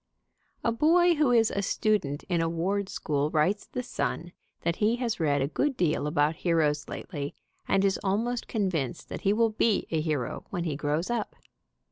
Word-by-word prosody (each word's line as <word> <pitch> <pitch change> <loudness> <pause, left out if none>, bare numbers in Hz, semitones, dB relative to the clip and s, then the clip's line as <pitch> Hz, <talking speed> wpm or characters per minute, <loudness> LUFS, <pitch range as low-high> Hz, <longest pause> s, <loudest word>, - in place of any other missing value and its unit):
A 230 - +2
boy 340 +8 +4
who 300 -4 +2
is 230 -2 +4
a 200 - -1
student 200 -9 0
in 175 -3 0
a 165 - +1
ward 190 +4 -1
school 145 -1 -1
writes 160 +7 +1
The 250 - -4
Sun 175 -7 -3 0.3
that 170 +1 -1
he 220 +2 +2
has 240 -4 -2
read 145 -4 +2
a - - 0
good 270 - -1
deal 155 -4 +1
about 150 +1 +1
heroes 155 -4 +1
lately, 145 -5 -5 0.3
and 195 0 +3
is 195 0 +1
almost 230 +5 -1
convinced 180 - -2
that - - -5
he 200 - +2
will 225 +1 +3
be 215 -1 +1
a 160 -2 +1
hero 150 -6 -2
when 175 -3 -3
he 160 -4 -2
grows 150 +7 -1
up. 235 -3 -2
185 Hz, 185 wpm, -28 LUFS, 155-225 Hz, 0.3 s, boy